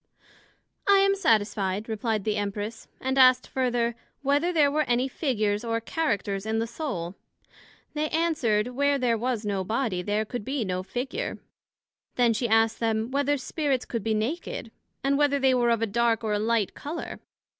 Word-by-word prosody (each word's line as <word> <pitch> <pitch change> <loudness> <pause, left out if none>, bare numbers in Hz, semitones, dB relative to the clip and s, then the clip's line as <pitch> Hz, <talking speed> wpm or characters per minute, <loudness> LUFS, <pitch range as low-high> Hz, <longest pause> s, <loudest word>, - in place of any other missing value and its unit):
I 400 - +8
am 395 0 +4
satisfied, 210 - +1
replied 220 -1 -1
the 215 0 0
Empress; 205 +2 -4
and 265 +1 0
asked 255 -1 +6
further, 240 -3 0 0.3
Whether 290 +5 +2
there 300 -5 +4
were 305 +1 +2
any 245 +2 +2
Figures 215 -7 -1
or 230 -1 -1
Characters 205 - -1
in 220 +1 -1
the 225 - +1
Soul? 225 - -4 0.8
They 305 0 -1
answered, 265 -10 +1
Where 285 +3 +1
there 245 -3 +2
was 235 -1 -2
no 200 -2 -1
Body, 220 -2 -1
there 210 +3 0
could 240 0 -5
be 265 -1 -2
no 185 -1 -2
Figure. 265 - -4 0.8
Then 240 -2 +4
she 235 +2 -1
asked 225 0 +3
them, 225 +1 0
Whether 285 +1 +1
Spirits 275 -1 -1
could 230 -4 -4
be 220 0 +1
naked? 230 0 -3 0.3
and 275 +1 +2
whether 285 -1 +3
they 265 -1 +3
were 240 -1 +3
of 230 -1 +2
a - - +4
dark, 230 +1 +1
or 215 -1 0
a 205 - +1
light 220 -2 +1
colour? 310 +4 -6
235 Hz, 175 wpm, -26 LUFS, 215-275 Hz, 0.8 s, I